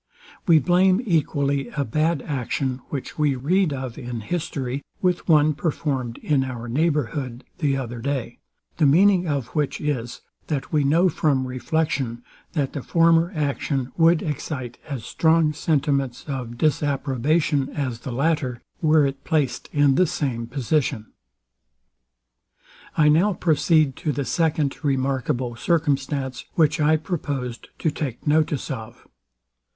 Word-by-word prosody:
We 165 -3 +7
blame 185 +4 +4
equally 140 - +1
a 140 - +1
bad 155 +5 0
action, 130 -1 -2
which 140 +1 -6
we 145 -3 +2
read 170 +7 +1
of 130 -3 -5
in 120 -3 -5
history, 140 -4 -3 0.2
with 180 -1 0
one 155 -1 +5
performed 140 -6 -2
in 145 -3 +2
our 120 -2 -5
neighbourhood 135 -2 -1 0.2
the 140 -5 +1
other 120 -3 -5
day: 135 0 -3 0.4
The 150 - +4
meaning 180 +4 +4
of 140 -5 -2
which 150 -3 -1
is, 125 -6 -3 0.3
that 145 -1 -3
we 150 -2 +3
know 165 +6 +4
from 140 -6 +1
reflection, 130 -1 -2 0.3
that 145 -5 -1
the 140 - -4
former 165 +3 +3
action 140 -3 -1
would 165 -1 +4
excite 135 -5 -4
as 130 -6 -5
strong 160 -1 +3
sentiments 140 -4 0
of 125 -4 -5
disapprobation 145 0 +1
as 130 -5 -3
the 125 - -6
latter, 135 -2 0 0.2
were 155 -2 +4
it 135 0 -3
placed 145 -7 -1
in 145 -2 +4
the 180 +6 +3
same 130 -9 -2
position. 130 -3 -1 1.9
I 150 - +5
now 170 +7 +4
proceed 155 -4 +2
to 155 - -1
the 140 0 -2
second 155 0 0
remarkable 130 -3 0
circumstance, 140 -3 -1
which 155 -2 +3
I 155 +1 +4
proposed 140 -7 -4
to 160 - 0
take 135 -6 -5
notice 150 -2 +1
of. 120 -2 -8
145 Hz, 135 wpm, -23 LUFS, 130-155 Hz, 1.9 s, We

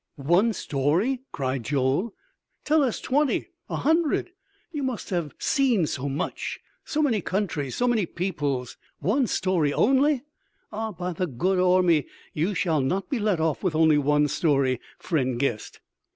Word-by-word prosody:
"One 175 +11 +3
story?" 175 - 0
cried 130 -1 -2
Joel. 140 - 0 0.5
"Tell 310 +1 +4
us 255 -5 0
twenty, 285 +1 0 0.2
a - - -2
hundred! 325 +2 +1 0.4
You 300 -3 -4
must 260 -7 -3
have 170 -5 -2
seen 250 - +2
so 140 -1 -3
much! 145 +7 -3 0.2
so 310 0 -1
many 230 -8 +2
countries! 160 -9 -2
so 245 - +1
many 220 -7 +2
peoples! 145 -9 -3 0.2
One 230 - +1
story 175 -9 +1
only? 270 - +3 0.5
Ah, 220 +1 -3
by 180 -1 -4
the 180 +2 -2
good 180 +8 0
Ormi, 180 -5 +4 0.3
you 175 +7 0
shall 160 -5 +1
not 185 - -1
be 265 - 0
let 205 -5 +1
off 160 -2 0
with 180 -5 0
only 160 -2 +5
one 150 +1 +3
story, 135 -5 +1 0.2
friend 130 -8 -1
guest!" 120 -6 -2
180 Hz, 150 wpm, -25 LUFS, 145-225 Hz, 0.5 s, only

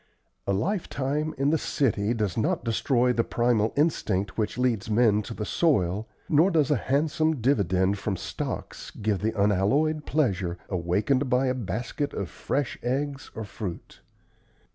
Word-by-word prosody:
A - - +2
lifetime 150 - -1
in 140 +2 +2
the 160 - +2
city 115 -4 0
does 105 -5 -1
not 110 +1 0
destroy 125 +2 +2
the 115 - +2
primal 115 -3 +1
instinct 105 - +1
which 110 +1 -2
leads 120 -3 0
men 105 -1 +4
to 115 +2 -7
the 105 - -3
soil 105 - +1 0.2
nor 160 +5 +4
does 155 -6 +2
a - - +5
handsome 150 +4 +1
dividend 100 -6 +2
from 100 -1 -2
stocks - - -5
give 105 -2 -1
the 110 0 -2
unalloyed 130 +11 +2
pleasure 95 - 0
awakened 100 +10 +1
by 125 +1 +3
a 130 - +1
basket 120 - -3
of - - -3
fresh 140 -2 -2
eggs 140 +3 -2
or 110 - -4
fruit. 100 -3 -7
120 Hz, 150 wpm, -26 LUFS, 100-140 Hz, 0.2 s, a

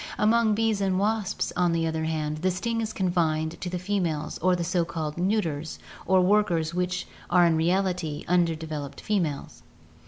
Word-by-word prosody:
Among 220 0 +3
bees 220 -2 +1
and 190 -1 +1
wasps, 210 0 -1
on 175 -1 +2
the 165 0 +1
other 160 0 -1
hand, 155 -1 -2
the 185 +4 +1
sting 230 +6 -2
is 220 -1 -3
confined 165 -4 0
to 180 - -3
the 180 - -3
females 175 -5 -2
or 185 0 +3
to - - +1
the 170 - -2
so 175 0 +1
called 155 -2 -4
neuters 170 -6 -1 0.3
or 190 -1 +5
workers 180 -5 +2
which 180 +1 -1 0.2
are 180 -1 +5
in 165 -1 +3
reality 175 -2 0
undeveloped 160 -4 -1
females. 170 -9 -2
180 Hz, 175 wpm, -26 LUFS, 160-195 Hz, 0.3 s, or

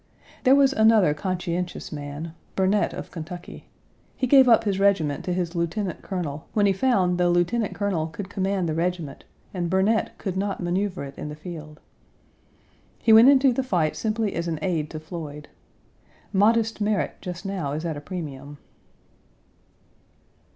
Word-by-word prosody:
There 260 +2 +7
was 275 -1 +4
another 220 - +5
conscientious 180 +2 -3
man 145 +2 -6 0.2
Burnet, 195 +2 +2
of - - -8
Kentucky. 175 +1 -8 0.5
He 260 - 0
gave 265 0 +6
up 225 -1 +6
his 200 -3 -1
regiment 190 -8 +2
to 180 - -1
his 175 -1 -2
lieutenant 175 +2 -2
colonel 160 -6 -5
when 205 -2 +3
he 195 - +4
found 190 -5 +2
the 175 0 +3
lieutenant 175 +6 +1
colonel 190 -6 -1
could 185 +4 -7
command 195 -2 -1
the 155 - -1
regiment 170 -3 -3 0.3
and 175 -3 -2
Burnet 195 +5 +1
could 190 -3 -4
not 200 0 -2
maneuver 180 0 -1
it 140 0 -8
in 150 - -5
the 150 - -7
field. 155 -2 -9 1.2
He 225 - +4
went 225 +4 +9
into 270 -2 +5
the 265 - 0
fight 175 -12 0
simply 220 -1 -1
as 170 0 -3
an 165 -2 -2
aide 160 -5 -1
to 155 - -6
Floyd. 155 -2 -8 0.8
Modest 220 +2 +2
merit 205 -1 0
just 180 0 -7
now 185 -8 -3
is 155 +3 -4
at 160 -2 -2
a 145 - -7
premium. 145 -4 -7
180 Hz, 160 wpm, -24 LUFS, 160-205 Hz, 1.2 s, went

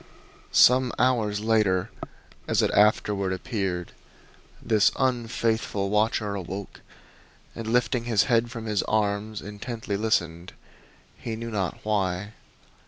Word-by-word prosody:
Some 125 0 +5
hours 110 -5 +1
later, 105 -5 +1 0.6
as - - +2
it - - +1
afterward 105 -2 +2
appeared, 95 -1 -3 0.7
this 110 -3 +3
unfaithful 115 -5 -1
watcher 105 0 +1
awoke 95 +1 -6 0.7
and 115 - -6
lifting 125 +1 +1
his 115 -4 +3
head 115 0 +2
from 115 -2 -7
his 105 -2 0
arms 105 0 -1
intently 105 0 -5
listened 90 -5 -1 0.7
he 115 - -4
knew 115 +1 -6
not 95 -5 -2
why. 100 -2 -1
105 Hz, 110 wpm, -26 LUFS, 100-115 Hz, 0.7 s, Some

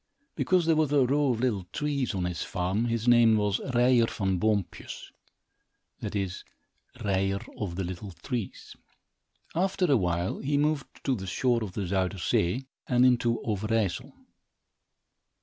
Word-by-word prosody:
Because 185 -2 +2
there 165 -1 +4
was 155 -2 +2
a 140 -3 +4
row 140 +2 +2
of 115 -1 -2
little 105 -8 0
trees 140 -6 -1
on 90 -2 -1
his 90 -2 -3
farm, 95 +5 -1
his 115 0 -1
name 120 -2 +6
was 105 -1 0
Ryer 120 -1 +4
Van 95 -5 -1
Boompjes; 100 -5 -2 0.9
that - - -5
is, 95 -2 -3 0.6
Ryer 95 0 +1 0.2
of 95 -5 -3
the 95 - -2
Little 95 +3 -6
Trees. 115 +3 -6 0.8
After 185 +2 +1
a 135 - +6
while, 90 -2 -1
he 140 +1 0
moved 150 -1 -1
to 135 - +1
the 95 -6 -4
shore 120 +4 +1
of 100 -4 -6
the 100 - -3
Zuyder 95 +1 -1
Zee 90 +8 0 0.2
and 125 0 +4
into 120 -2 +3
Overijssel. 110 -1 -1
110 Hz, 150 wpm, -28 LUFS, 95-130 Hz, 0.9 s, name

